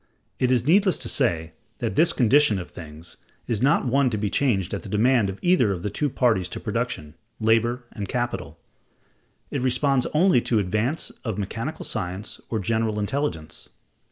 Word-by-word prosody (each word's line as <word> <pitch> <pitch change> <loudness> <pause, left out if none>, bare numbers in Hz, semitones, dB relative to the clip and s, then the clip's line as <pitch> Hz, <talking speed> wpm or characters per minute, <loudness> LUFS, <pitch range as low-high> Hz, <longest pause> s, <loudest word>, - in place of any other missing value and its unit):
It 125 - +2
is 125 -2 +2
needless 190 +4 +4
to - - -4
say 85 - 0 0.3
that 115 - -3
this 165 +3 +5
condition 125 -2 +4
of 90 -1 -7
things 80 0 -10 0.3
is 110 -4 -1
not 135 +1 +3
one 130 +1 +3
to 110 - -2
be 105 -1 -2
changed 100 -10 +1
at - - -3
the - - -10
demand 115 0 +3
of 95 - -6
either 175 - +4
of 90 -3 -4
the 105 - -2
two 145 +7 -1
parties 110 -9 +1
to - - -5
production, 75 0 -3 0.3
Labor 115 +3 +2
and 100 -4 -6
Capital; 120 -1 -3 0.9
it 140 - -2
responds 130 +1 +2
only 170 -4 +3
to 120 - -1
the 105 - +4
advance 110 - -1
of 110 -6 -3
mechanical 115 +10 -4
science 95 -1 -4
or 115 - -1
general 110 +1 0
intelligence. 105 - -3
115 Hz, 180 wpm, -24 LUFS, 100-135 Hz, 0.9 s, this